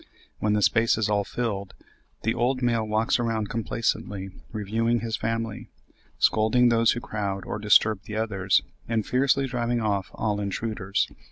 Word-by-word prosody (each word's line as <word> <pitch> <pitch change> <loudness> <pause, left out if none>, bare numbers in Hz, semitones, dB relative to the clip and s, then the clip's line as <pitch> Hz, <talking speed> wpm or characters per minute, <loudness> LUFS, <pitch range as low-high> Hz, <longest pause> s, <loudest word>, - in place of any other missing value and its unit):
When 105 -1 +1
the 105 -1 +2
space 115 +2 +3
is 110 -1 0
all 100 -1 +2
filled, 100 -3 -3 0.5
the 115 - +1
old 130 +2 0
male 115 -2 +2
walks 110 +4 +1
around 110 -3 -1
complacently 105 -4 -2 0.2
reviewing 115 +2 0
his 115 -1 -2
family, 115 -1 -3 0.5
scolding 110 +3 +4
those 115 -1 +4
who 120 - -3
crowd 100 -4 -4
or 105 - -4
disturb 105 -1 +4
the 105 - -6
others, 100 -4 +1 0.3
and 110 -3 0
fiercely 135 +1 +2
driving 120 -2 -1
off 100 -3 -1
all 105 -2 -1
intruders. 100 -1 -1
110 Hz, 155 wpm, -26 LUFS, 105-115 Hz, 0.5 s, scolding